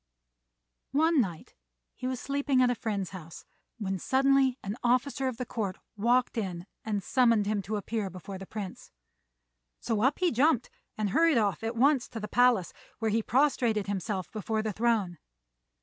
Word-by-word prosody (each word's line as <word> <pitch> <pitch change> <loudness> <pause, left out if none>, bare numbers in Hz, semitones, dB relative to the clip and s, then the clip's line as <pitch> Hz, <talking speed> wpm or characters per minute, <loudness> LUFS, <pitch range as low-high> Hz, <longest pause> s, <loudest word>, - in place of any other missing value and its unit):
One 315 0 +4
night 175 -7 -5 0.4
he 255 - -5
was 255 -1 -2
sleeping 280 -1 0
at 250 -1 +4
a - - +2
friend's 205 -5 -3
house 165 -4 -10 0.3
when 195 -4 -3
suddenly 270 +1 +3
an 200 +2 -3
officer 255 +2 +1
of 255 -3 -3
the 250 - -3
court 205 -6 -3 0.2
walked 240 +3 +2
in 180 -4 -4 0.2
and 205 -3 -2
summoned 230 -4 +3
him 205 0 0
to 205 +4 -4
appear 210 0 -2
before 185 +2 -8
the 195 - -9
Prince; 205 -4 -7 0.9
so 220 -2 -1
up 265 +5 +3
he 360 -1 +2
jumped, 255 0 +2 0.3
and 210 -2 -1
hurried 325 - +4
off 210 -2 +1
at 225 +1 -3
once 270 +2 +3
to 230 - -7
the 210 - -5
palace, 245 -7 +3 0.2
where 225 -1 -1
he 225 +2 +2
prostrated 240 -4 +2
himself 195 -1 -3
before 215 0 -2
the 215 -1 -2
throne. 215 -6 0
225 Hz, 170 wpm, -29 LUFS, 200-255 Hz, 0.9 s, One